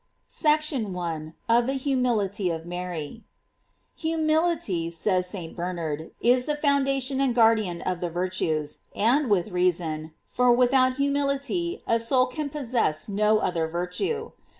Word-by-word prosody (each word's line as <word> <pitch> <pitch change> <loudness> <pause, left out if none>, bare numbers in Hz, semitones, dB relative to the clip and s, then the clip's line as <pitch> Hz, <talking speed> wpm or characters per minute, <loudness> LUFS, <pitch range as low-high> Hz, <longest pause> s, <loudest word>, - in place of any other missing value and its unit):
SECTION 300 - +1
I. 160 -3 -4
OF 235 +1 +3
THE 270 - 0
HUMILITY 240 -8 0
OF 165 -1 -4
MARY, 175 +2 -6 0.7
Humility, 315 - 0
says 180 +2 +1
St. 175 -5 -6
Bernard, 165 -3 -4
is 250 +1 +3
the 300 - 0
foundation 275 -2 +1
and 260 -3 +1
guardian 220 -7 +3
of 185 -1 -2
the 175 - -1
virtues 165 -4 -2
;§ - - -25 0.2
and 250 +5 +2
with 200 -1 +2
reason, 170 -4 -1
for 250 0 +2
without 255 +1 +4
humility 280 +5 -1
a 230 - +2
soul 255 +3 +3
can 285 +3 -4
possess 245 - -1
no 210 +1 +2
other 170 -6 -1
virtue. 380 - -3
225 Hz, 135 wpm, -25 LUFS, 175-275 Hz, 0.7 s, without